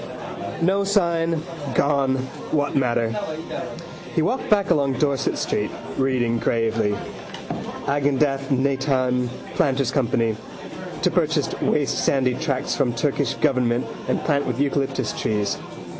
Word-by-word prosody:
No 195 Hz, +3 st, +3 dB
sign. 170 Hz, -5 st, +1 dB, 0.3 s
Gone. 140 Hz, -2 st, +3 dB, 0.3 s
What 145 Hz, -2 st, 0 dB
matter? 120 Hz, -4 st, +2 dB, 1.0 s
He 160 Hz, -, +3 dB
walked 255 Hz, +8 st, -1 dB
back 200 Hz, -3 st, +3 dB
along 140 Hz, -5 st, +3 dB
Dorset 140 Hz, +1 st, +1 dB
street, -, -, 0 dB, 0.3 s
reading 125 Hz, -3 st, +1 dB
gravely. 110 Hz, -3 st, +1 dB, 0.9 s
Agendath 140 Hz, -1 st, +1 dB
Netaim: 130 Hz, -2 st, +1 dB, 0.2 s
planters' 135 Hz, -2 st, +2 dB
company. 115 Hz, -4 st, +1 dB, 0.7 s
To -, -, +4 dB
purchase -, -, +1 dB
waste -, -, +1 dB
sandy 130 Hz, -2 st, +3 dB
tracts 130 Hz, +1 st, -1 dB
from 130 Hz, -4 st, +1 dB
Turkish 140 Hz, +1 st, 0 dB
government 125 Hz, -5 st, +2 dB, 0.2 s
and -, -, +1 dB
plant 145 Hz, -2 st, +1 dB
with 125 Hz, 0 st, -2 dB
eucalyptus 135 Hz, -4 st, 0 dB
trees. 105 Hz, -2 st, 0 dB
135 Hz, 115 wpm, -23 LUFS, 125-145 Hz, 1.0 s, To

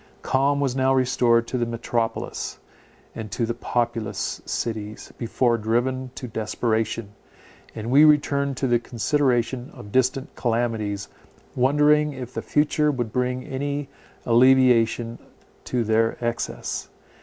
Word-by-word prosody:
Calm 140 Hz, +2 st, +2 dB
was 135 Hz, -3 st, 0 dB
now 135 Hz, 0 st, +3 dB
restored 120 Hz, -2 st, +3 dB
to 125 Hz, -, -2 dB
the 120 Hz, -, +1 dB
metropolis, 115 Hz, 0 st, -3 dB, 0.6 s
and 110 Hz, -1 st, -6 dB
to 115 Hz, -, -1 dB
the 115 Hz, -, -2 dB
populous 115 Hz, -4 st, -2 dB
cities, 110 Hz, -2 st, -4 dB
before 120 Hz, 0 st, +1 dB
driven 125 Hz, +4 st, 0 dB
to 125 Hz, -, -6 dB
desperation; 110 Hz, -1 st, -2 dB, 0.6 s
and 115 Hz, +2 st, -4 dB
we 145 Hz, +3 st, +7 dB
returned 140 Hz, -2 st, +3 dB
to 135 Hz, -, -1 dB
the 120 Hz, -2 st, +3 dB
consideration 125 Hz, 0 st, 0 dB
of 105 Hz, -, -11 dB
distant 130 Hz, +2 st, 0 dB
calamities, 115 Hz, -4 st, -1 dB, 0.5 s
wondering 150 Hz, +3 st, +3 dB
if 130 Hz, -2 st, -8 dB
the -, -, -3 dB
future 150 Hz, 0 st, +1 dB
would 120 Hz, -6 st, -2 dB
bring 125 Hz, 0 st, -1 dB
any 140 Hz, +1 st, -3 dB, 0.4 s
alleviation 120 Hz, -1 st, +4 dB, 0.5 s
to 125 Hz, -2 st, 0 dB
their 110 Hz, +1 st, +1 dB
excess. 120 Hz, -1 st, -3 dB
120 Hz, 125 wpm, -24 LUFS, 115-130 Hz, 0.6 s, we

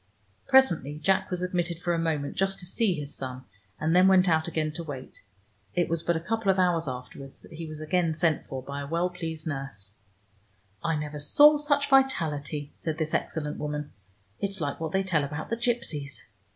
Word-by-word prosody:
Presently 170 Hz, -, +4 dB
Jack 190 Hz, +5 st, +1 dB
was 180 Hz, -1 st, -2 dB
admitted 175 Hz, -2 st, -1 dB
for 175 Hz, 0 st, 0 dB
a 170 Hz, -, 0 dB
moment 155 Hz, -4 st, -1 dB
just 195 Hz, +1 st, 0 dB
to 180 Hz, -, -8 dB
see 190 Hz, +1 st, +1 dB
his 145 Hz, -2 st, -4 dB
son, 130 Hz, -1 st, -6 dB, 0.4 s
and 160 Hz, +2 st, +1 dB
then 185 Hz, +1 st, +7 dB
went 190 Hz, -1 st, +5 dB
out 160 Hz, -1 st, +3 dB
again 155 Hz, -2 st, -1 dB
to 170 Hz, +3 st, -5 dB
wait. 140 Hz, -5 st, -8 dB, 0.5 s
It 175 Hz, -1 st, +1 dB
was 165 Hz, -1 st, 0 dB
but 170 Hz, 0 st, +1 dB
a -, -, 0 dB
couple 225 Hz, +4 st, -1 dB
of 190 Hz, -, +4 dB
hours 175 Hz, -3 st, +2 dB
afterwards 130 Hz, +2 st, -8 dB
that -, -, -14 dB
he 160 Hz, 0 st, -6 dB
was 155 Hz, -1 st, -8 dB
again 165 Hz, +1 st, +1 dB
sent 160 Hz, -1 st, +1 dB
for 130 Hz, -1 st, -5 dB
by 140 Hz, +1 st, -5 dB
a 140 Hz, -, -5 dB
well 170 Hz, +4 st, 0 dB
pleased 160 Hz, -3 st, -5 dB
nurse. 135 Hz, -10 st, -5 dB, 0.9 s
"I 165 Hz, -1 st, +1 dB
never 150 Hz, 0 st, -4 dB
saw 295 Hz, -, +6 dB
such 285 Hz, -1 st, +1 dB
vitality," 155 Hz, -, +1 dB
said 160 Hz, -2 st, -4 dB
this 155 Hz, -1 st, -2 dB
excellent 150 Hz, -2 st, -2 dB
woman. 150 Hz, 0 st, -3 dB, 0.5 s
"It's 195 Hz, -1 st, -2 dB
like 145 Hz, -3 st, -2 dB
what 160 Hz, -1 st, -3 dB
they 190 Hz, +2 st, +1 dB
tell 170 Hz, -6 st, +1 dB
about 150 Hz, +6 st, -5 dB
the -, -, +2 dB
gipsies." 150 Hz, -, -2 dB
160 Hz, 200 wpm, -28 LUFS, 150-180 Hz, 0.9 s, then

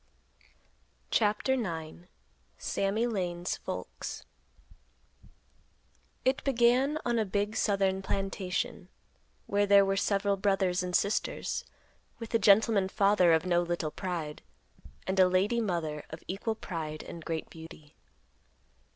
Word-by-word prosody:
CHAPTER 215 Hz, +4 st, +2 dB
IX. 170 Hz, -7 st, -4 dB, 0.5 s
SAMMY 200 Hz, +4 st, 0 dB
LANE'S 180 Hz, -6 st, -2 dB
FOLKS. -, -, -6 dB, 2.0 s
It 260 Hz, +1 st, +2 dB
began 260 Hz, +3 st, +3 dB
on 240 Hz, -1 st, +1 dB
a -, -, +3 dB
big 205 Hz, +2 st, -1 dB
southern 195 Hz, -3 st, +1 dB
plantation, 195 Hz, -2 st, -3 dB, 0.6 s
where 205 Hz, 0 st, +1 dB
there 200 Hz, 0 st, +7 dB
were 195 Hz, 0 st, +1 dB
several 200 Hz, 0 st, +1 dB
brothers 190 Hz, -2 st, +1 dB
and 180 Hz, -1 st, -2 dB
sisters, 205 Hz, +2 st, 0 dB, 0.5 s
with 230 Hz, -1 st, -8 dB
a 230 Hz, -, +4 dB
gentleman 200 Hz, -1 st, +4 dB
father 195 Hz, -3 st, +4 dB
of 160 Hz, +2 st, +3 dB
no 175 Hz, -1 st, +3 dB
little 170 Hz, -3 st, -2 dB
pride, 165 Hz, -5 st, -4 dB, 0.6 s
and 190 Hz, 0 st, -1 dB
a 185 Hz, -, +7 dB
lady 200 Hz, +6 st, +2 dB
mother 165 Hz, -7 st, -2 dB
of 160 Hz, -, -9 dB
equal 210 Hz, +4 st, -2 dB
pride 155 Hz, -6 st, -5 dB
and 165 Hz, -, -9 dB
great 160 Hz, -1 st, -4 dB
beauty. 160 Hz, -2 st, -12 dB
195 Hz, 115 wpm, -30 LUFS, 175-210 Hz, 2.0 s, there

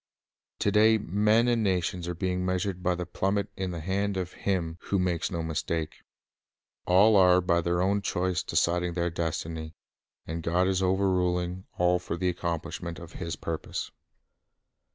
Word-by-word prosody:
To 100 Hz, -, +2 dB
day 110 Hz, +1 st, +5 dB
men 105 Hz, +4 st, +2 dB
and 120 Hz, -2 st, +2 dB
nations 90 Hz, -2 st, 0 dB
are 90 Hz, -, -3 dB
being 90 Hz, +1 st, -1 dB
measured 90 Hz, 0 st, -1 dB
by 90 Hz, 0 st, +1 dB
the 90 Hz, 0 st, -4 dB
plummet 95 Hz, +3 st, -1 dB
in 95 Hz, -1 st, -3 dB
the 85 Hz, -2 st, -5 dB
hand 100 Hz, +3 st, -1 dB
of 90 Hz, -1 st, -3 dB
Him 85 Hz, -4 st, -2 dB
who 100 Hz, -, 0 dB
makes 90 Hz, -3 st, 0 dB
no 85 Hz, -4 st, -3 dB
mistake. 80 Hz, 0 st, -2 dB, 0.9 s
All 100 Hz, +5 st, +6 dB
are 90 Hz, -2 st, +6 dB
by 85 Hz, -1 st, +2 dB
their 85 Hz, +1 st, +1 dB
own 100 Hz, +2 st, +1 dB
choice 90 Hz, -2 st, 0 dB
deciding 90 Hz, +1 st, +1 dB
their 85 Hz, 0 st, -1 dB
destiny, 80 Hz, -1 st, -4 dB, 0.5 s
and 80 Hz, +1 st, -4 dB
God 90 Hz, +3 st, +1 dB
is 95 Hz, -1 st, +1 dB
overruling 90 Hz, -1 st, +1 dB
all 90 Hz, 0 st, +3 dB
for 85 Hz, -1 st, -4 dB
the 90 Hz, +1 st, +1 dB
accomplishment 85 Hz, 0 st, -4 dB
of 85 Hz, -2 st, -10 dB
His 85 Hz, -3 st, -4 dB
purposes. 80 Hz, -1 st, -4 dB
90 Hz, 160 wpm, -28 LUFS, 85-95 Hz, 0.9 s, All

